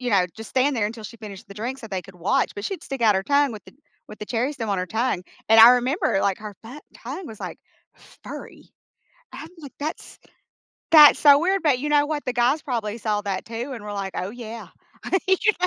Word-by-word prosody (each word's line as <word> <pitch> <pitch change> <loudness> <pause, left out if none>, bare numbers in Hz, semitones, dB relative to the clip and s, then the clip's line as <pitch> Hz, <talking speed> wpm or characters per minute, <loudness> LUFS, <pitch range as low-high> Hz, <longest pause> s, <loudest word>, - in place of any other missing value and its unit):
you 245 -1 -2
know, 185 -3 +3
just 225 0 -9
stand 265 +1 +1
there 205 - +1
until 220 0 -8
she 230 - -9
finished 205 -4 -10
the 200 - -11
drink 240 +6 -5
so 225 - -9
they 190 -3 -4
could 195 0 -15
watch, 175 +2 0
but 205 - -6
she'd 390 - -4
stick 270 -2 -6
out 215 -3 +5
her 190 - 0
tongue 280 +3 +2
with 215 - -10
the - - -16 0.4
with 215 - -11
the 210 - -7
cherry 250 +4 -1
stem 235 -7 -5
on 195 - 0
her 180 - -2
tongue, 220 -1 -1 0.3
and 225 0 +7
I 235 +2 +11
remember, 250 - +1
like, 195 -2 0
her 210 -1 -8
fu 255 +7 -10
tongue 375 - -8
was, 220 -6 -10
like, - - -6 0.7
furry. - - -10 0.6
I'm 315 - -9
like 285 -4 -11
"That's 305 +2 -6 0.7
that's 300 -2 +9
so 285 -1 +7
weird," 380 +4 0
but 285 -6 +2
you 295 +3 -3
know 290 0 +4
what, 300 -1 -3
the 250 - -2
guys 245 +5 +1
probably 225 -5 -3
saw 210 -2 -1
that 195 -2 -3
too 235 +4 -6
and 220 -3 -9
were 205 - -6
like, 195 -1 -5
"Oh 185 +2 -3
yeah," 230 0 -9 0.6
you 380 - +5
know? 430 - +6
230 Hz, 240 wpm, -23 LUFS, 210-280 Hz, 0.7 s, I